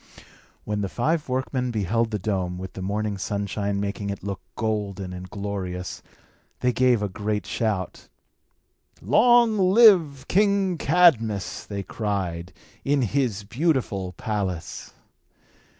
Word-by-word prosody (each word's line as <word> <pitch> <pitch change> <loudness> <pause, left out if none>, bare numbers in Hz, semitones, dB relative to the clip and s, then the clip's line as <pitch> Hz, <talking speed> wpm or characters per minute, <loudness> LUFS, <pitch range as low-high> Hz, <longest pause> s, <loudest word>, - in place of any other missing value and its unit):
When 105 -1 -2
the 100 - -2
five 150 - -1
workmen 130 0 -1
beheld 115 +1 0
the 105 - -2
dome, 90 -3 -2
with 95 0 -7
the 95 - -7
morning 100 +1 -2
sunshine 100 0 -2
making 100 0 -3
it 100 -2 -5
look 100 -1 -4
golden 100 -4 -2
and 90 0 -8
glorious, 95 -3 -5 0.6
they 125 0 +2
gave 125 -4 +3
a - - +1
great 105 +2 -3
shout. 105 -5 -3 0.9
"Long 225 - +4
live 185 - +5
King 200 -3 +2
Cadmus," 130 - +2
they 100 -1 -4
cried, 95 -4 -3 0.3
"in 140 -1 +2
his 120 -4 0
beautiful 115 - -1
palace." 95 -5 -4
105 Hz, 120 wpm, -24 LUFS, 100-130 Hz, 0.9 s, live